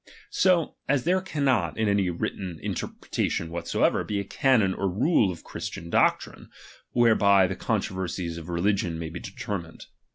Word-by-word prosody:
So 180 -4 +2
as 140 -3 +2
there 185 +3 +2
cannot, 135 - 0
in 110 - +1
any 100 -2 +2
written 85 0 -4
interpretation 80 -1 -3
whatsoever, 85 0 +1
be 105 -1 -2
a - - -2
canon 110 -2 +2
or 95 +1 -1
rule 110 - +2
of 85 - -10
Christian 85 0 -7
doctrine, - - +1 0.4
whereby 105 -5 +4
the 95 +1 -2
controversies 90 -3 -2
of 85 +1 -10
re 85 0 -2
ligion 100 -3 +1
may 80 -1 -5
be 85 +2 -7
determined. 100 -5 -6
95 Hz, 155 wpm, -26 LUFS, 85-115 Hz, 0.4 s, whereby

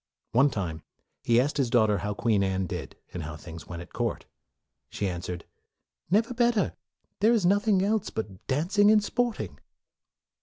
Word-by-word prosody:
One 130 +6 +5
time, 85 - -4 0.4
he 115 0 +4
asked 140 +4 +1
his 135 -4 +1
daughter 110 -4 +3
how 105 0 -3
Queen 110 -3 +2
Anne 95 0 0
did, - - -6 0.2
and 90 - -4
how 75 0 -6
things 80 +1 -10
went 85 -1 -6
at - - -18
court. - - -2 0.6
She 100 - -2
answered, 90 -1 -5 0.6
"Never 225 +6 +2
better; 240 -4 +2 0.5
there 220 +4 +5
is 215 -6 +2
nothing 200 +1 +3
else 210 +1 +1
but 105 -4 -6
dancing 185 +10 +3
and 215 -1 +5
sporting." 240 +2 -2
125 Hz, 160 wpm, -27 LUFS, -, 0.6 s, One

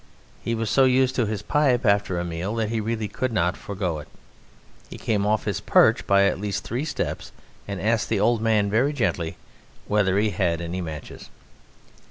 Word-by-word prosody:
He 115 - -1
was 110 -2 -2
so 135 +4 +5
used 130 0 +3
to 120 -4 0
his 105 -1 -3
pipe 135 -4 +2
after 100 -3 +2
a 85 - -2
meal 85 +5 -3
that 110 -2 -1
he 115 -1 -1
really 110 0 -2
could 130 +4 -3
not 90 -4 +1
forgo 95 -5 -4
it. 75 - -10 0.8
He - - -8
came 105 -2 0
off 110 -1 +1
his - - -1
perch - - +4
by 100 0 +5
at 100 - +1
least 100 -1 -2
three 125 +6 -3
steps - - -4 0.4
and 100 -2 -4
asked 110 -3 0
the 110 - +1
old 115 +2 +2
man 110 -2 +2
very 120 +8 +2
gently 90 - -1 0.5
whether 100 -2 +2
he 105 +1 +2
had 85 -3 0
any 85 +2 -4
matches. 80 -4 -8
105 Hz, 195 wpm, -24 LUFS, 95-115 Hz, 0.8 s, so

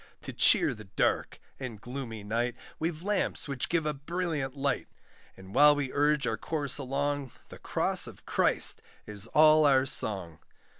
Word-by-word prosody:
To - - -7
cheer - - +4
the 110 0 -11
dark 95 - -1 0.2
and 125 -6 -6
gloomy 120 -3 -7
night, 120 +3 -1 0.2
We've 160 0 -3
lamps 205 -5 -1
which 135 -3 -3
give 165 -2 0
a 150 - 0
brilliant 150 -2 -3
light, 140 -1 -1 0.5
And 95 +1 -13
while 150 0 +7
we 140 -3 -3
urge 145 -1 +2
our 115 -2 -1
course 145 +3 -1
along, 140 0 -2 0.2
The - - -11
cross - - +1
of - - -13
Christ - - +2 0.2
is 105 0 -4
all 155 +3 +5
our 135 -2 +4
song. 95 -10 -2
140 Hz, 160 wpm, -29 LUFS, 115-150 Hz, 0.5 s, while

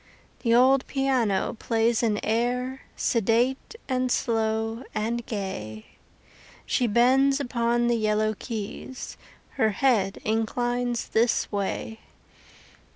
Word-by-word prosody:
The 230 -2 +2
old 260 +2 +4
piano 255 -8 +1
plays 230 0 +1
an 215 -3 +1
air, 250 +4 -1 0.2
Sedate 235 - +1
and 255 -1 0
slow 225 0 0
and 230 +3 -1
gay; 110 - -5 0.8
She 245 - +1
bends 265 +5 +4
upon 240 -2 0
the 240 0 +2
yellow 215 0 +1
keys, 220 +4 -6 0.4
Her 220 -5 +3
head 210 -3 +1
inclines 240 +2 -1
this 230 +1 +1
way. 205 +2 -3
235 Hz, 100 wpm, -26 LUFS, 220-250 Hz, 0.8 s, old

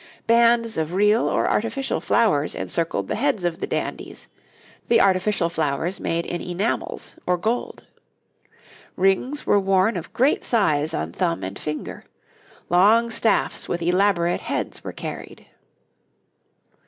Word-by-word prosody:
Bands 230 -3 +3
of 160 +3 -2
real 210 +4 +3
or - - +1
artificial 265 +5 -1
flowers 190 -11 +1
encircled 165 -1 -2
the - - -2
heads 265 -6 0
of 175 -1 -1
the - - -3
dandies, - - -5 0.6
the 235 - +4
artificial 190 -1 +2
flowers 160 +3 -2
made 170 +1 -2
in 175 - -4
enamels 180 +5 -3
or 180 0 +2
gold. 225 +7 -3 1.1
Rings 195 +10 0
were 205 - +4
worn 195 +2 +2
of 175 -2 -6
great 265 +5 +2
size 160 -8 +1
on - - -4
thumb 175 -2 -1
and 95 +1 -6
finger; 150 0 -5 0.6
long 215 +7 +4
staffs 225 -2 0
with 170 -1 -2
elaborate 175 -1 +2
heads - - -4
were - - -5
carried. - - -8
190 Hz, 130 wpm, -23 LUFS, 170-225 Hz, 1.1 s, the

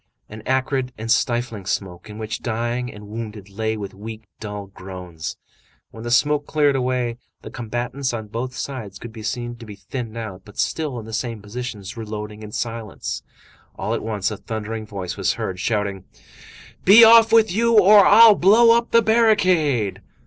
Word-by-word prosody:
An 110 +1 -9
acrid 130 -1 0
and 115 +1 -3
stifling 120 -6 0
smoke 95 +1 -4
in 105 - -9
which 110 0 -5
dying 120 +2 -2
and 105 -1 -12
wounded 105 -2 -7
lay 110 +2 -2
with 100 -2 -6
weak, 110 +3 -9 0.2
dull 105 -2 -6
groans. 90 -4 -8 0.5
When 110 - -11
the 120 - -4
smoke 145 +4 +2
cleared 145 -2 +2
away, 125 -2 -1 0.3
the - - -9
combatants 120 +3 -3
on 115 -2 -5
both 125 +4 -4
sides 115 -9 -6
could 115 +2 -10
be 110 - -9
seen 120 +2 -4
to 115 - -11
be 105 - -9
thinned 115 +4 -7
out, 105 -5 -6
but 105 - -16
still 150 -6 -1
in 110 - -7
the 110 - -9
same 115 -1 -3
positions, 105 0 -7
reloading 105 -1 -6
in 105 -1 -9
silence. 115 -2 -4 0.5
All - - -3
at - - -2
once, 105 -2 -2
a 105 - -5
thundering 110 0 -5
voice 95 -3 -5
was - - +1
heard, 95 -1 -4
shouting:— 100 -2 -2 0.8
"Be 210 +5 +9
off 225 0 +8
with 225 -3 +5
you, 230 +3 +2
or 205 0 +8
I'll 225 +2 +8
blow 225 +5 +6
up 235 0 0
the 230 0 +4
barricade!" 185 - +2
115 Hz, 180 wpm, -22 LUFS, 105-135 Hz, 0.8 s, Be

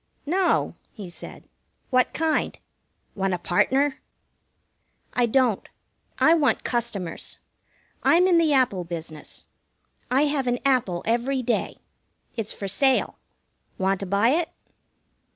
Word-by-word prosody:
"No," 360 +5 +1 0.2
he 200 -6 -9
said. - - -10 0.4
"What 255 -1 +3
kind? 320 0 0 0.6
Want 195 -2 0
a - - -4
partner?" 265 +11 +1 1.1
"I 245 -1 +2
don't. 245 -3 +1 0.5
I 320 - +5
want 305 -5 +2
customers. 205 -8 -3 0.6
I'm 350 +2 +5
in 355 -2 +5
the 320 -2 +3
Apple 250 -10 +2
business. 165 -3 -8 0.6
I 265 +3 +3
have 285 -3 0
an 245 0 +1
apple 240 -10 +1
every 250 +4 0
day. 235 0 -1 0.6
It's 225 -3 -3
for 200 - -5
sale. 260 +7 +2 0.6
Want 190 0 +1
to 195 - -5
buy 200 +5 +3
it?" 320 +4 +1
245 Hz, 120 wpm, -25 LUFS, 195-280 Hz, 1.1 s, I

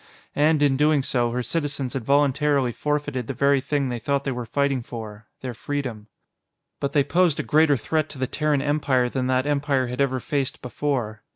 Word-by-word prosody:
And, 150 0 +3
in 135 -2 +3
doing 150 -1 +3
so, 120 -3 +1
her 125 +1 -2
citizens 140 -4 -2
had 135 -4 -3
voluntarily 140 -1 +2
forfeited 145 -3 -2
the - - -4
very 140 -1 +3
thing 140 0 -1
they 120 -1 -3
thought 140 +3 -1
they 135 - -2
were 120 -2 -5
fighting 140 +1 0
for 110 -3 -8
their 130 -2 -4
freedom. 125 -5 -4 0.7
But 140 0 -2
they 145 - +4
posed 170 +2 +2
a - - 0
greater 155 -2 +4
threat 155 +7 -1
to - - -10
the 130 - 0
Terran 145 +1 0
Empire 140 -4 +1
than 130 0 -2
that 130 +1 +1
Empire 140 -2 +1
had 125 +2 -3
ever 130 -2 +1
faced 140 0 -2
before. 125 -4 -2
140 Hz, 195 wpm, -24 LUFS, 125-145 Hz, 0.7 s, they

